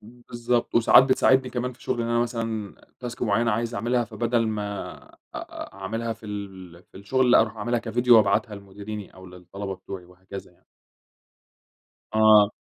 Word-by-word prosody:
بالضبط، 120 +1 -3
وساعات 120 +2 +7
بتساعدني 130 0 +3
كمان 125 0 -3
في 125 - -19
شغل 120 - -2
إن 115 - -3
أنا 120 0 +1
مثلًا 115 -3 -3 0.3
task 125 +1 -6
معيّنة 115 +1 +2
عايز 115 +2 -2
أعملها 120 +4 0
فبدل 115 +1 -1
ما 105 -2 -4
أ - - -22 0.2
أ - - -8
أعملها 115 +4 -4
في 110 0 -13
ال 95 -4 -8
في - - -19
الشغل 125 +5 +1
لأ، - - +7
أرُوح 115 0 -1
أعملها 120 +3 -1
كفيديو، 120 +1 +3
وأبعتها 105 +1 +2
لمديريني 100 +1 -9
أو 95 0 -13
للطلبة 90 +2 -7
بتوعي، 95 0 -9
وهكذا 95 +2 -11
يعني. - - -33 1.5
آه 110 -1 +6
110 Hz, 160 wpm, -25 LUFS, 100-120 Hz, 1.5 s, وساعات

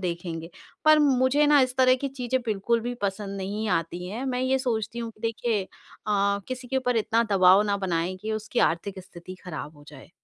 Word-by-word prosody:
देखेंगे 170 -2 -4 0.3
पर 310 0 +7
मुझे 280 0 +3
ना 290 -1 +6
इस 255 -1 +1
तरह 255 -1 +5
की 275 - 0
चीज़ें 260 -1 -2
बिल्कुल 220 +2 0
भी 245 +2 -4
पसंद 200 0 -3
नहीं 205 +3 -3
आती 175 0 -2
हैं, 235 +7 -5
मैं 250 -1 -1
ये 260 +1 +1
सोचती 235 -3 -2
हूँ 230 -1 -4
कि 215 - -26
देखिए 225 -2 -1 0.4
अ, 200 -1 +1
किसी 255 -1 -6
के 265 - -1
ऊपर 250 -2 0
इतना 225 +1 +2
दबाव 190 +1 +6
ना 205 -1 0
बनाएँ 175 +2 -1
कि 220 0 -3
उसकी 215 +2 -3
आर्थिक 190 +4 -6
स्थिति 185 0 -11
खराब 155 -3 -7
हो 145 - -16
जाए। 145 +1 -13
215 Hz, 205 wpm, -26 LUFS, 185-250 Hz, 0.4 s, पर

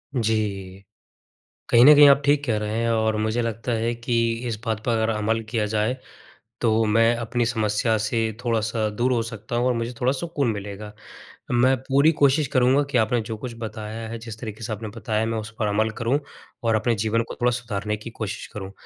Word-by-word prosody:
जी। 105 -5 -1 0.9
कहीं 120 +1 +7
न 150 +3 +10
कहीं 145 0 +8
आप 140 0 +6
ठीक 145 0 +3
कह 115 -4 +1
रहे 105 +1 -3
हैं 115 0 0
और 110 -1 +1
मुझे 110 +2 0
लगता 115 +1 -3
है 115 +1 0
कि 120 +1 -3 0.3
इस 115 - -2
बात 110 -3 -2
पर 120 - +1
अगर 110 -1 +1
अमल 110 +1 0
किया 115 -2 0
जाए, 110 +4 0 0.7
तो 115 -1 +3
मैं 115 +2 +3
अपनी 120 +1 -1
समस्या 110 -1 +1
से 110 +2 -1 0.2
थोड़ा-सा 110 -2 0
दूर 120 +5 0
हो 120 - +1
सकता 115 0 -6
हूँ 120 +1 +1
और 125 - +2
मुझे 115 +1 -3
थोड़ा 125 +1 +3
सुकून 140 -3 -1
मिलेगा। 105 0 -7 0.6
मैं 125 +2 +4
पूरी 140 +4 +4
कोशिश 140 +1 +4
करूँगा 130 +3 +4
कि 125 - +2
आपने 115 +1 +2
जो 110 0 -6
कुछ 120 +2 -6
बताया 110 0 -6
है, 115 0 -6
जिस 110 -1 -9
तरीके 110 -1 -7
से 110 - -3
आपने 110 +1 -6
बताया 110 -2 -1
है 110 - +1
मैं 115 0 -2
उस 110 0 -8
पर 110 - +1
अमल 110 +2 +1
करूँ 125 +5 +1 0.4
और 115 -1 +2
अपने 115 +2 +1
जीवन 115 +1 +1
को - - -6
थोड़ा 125 0 +3
सुधारने 105 -4 -3
की 105 +3 -9
कोशिश 110 -2 -5
करूँ। 100 -3 -6
115 Hz, 210 wpm, -23 LUFS, 110-120 Hz, 0.9 s, न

